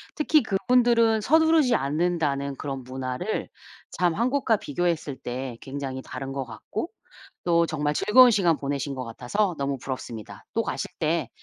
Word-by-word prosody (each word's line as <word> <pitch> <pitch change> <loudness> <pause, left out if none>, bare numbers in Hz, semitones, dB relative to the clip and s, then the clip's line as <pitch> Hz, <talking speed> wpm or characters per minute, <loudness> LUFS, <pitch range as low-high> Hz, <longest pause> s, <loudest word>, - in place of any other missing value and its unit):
특히 305 0 +3
그분들은 230 +1 +3
서두르지 315 -3 +4
않는다는 145 -2 0
그런 135 -2 -5
문화를 130 +9 -3 0.4
참 175 -2 +1
한국과 240 -1 +2
비교했을 160 -4 -2
때 125 -1 -5
굉장히 135 -1 -5
다른 135 +1 -6
것 135 -1 -3
같고 120 - -5 0.5
또 170 -1 +3
정말 150 -2 -1
즐거운 245 +8 +6
시간 175 -6 +3
보내신 140 0 -3
것 130 - -4
같아서 170 - -1
너무 140 -1 -1
부럽습니다. 120 -5 -7
또 230 - +1
가실 200 - -3
때 160 -4 0
155 Hz, 325 characters per minute, -25 LUFS, 135-215 Hz, 0.5 s, 즐거운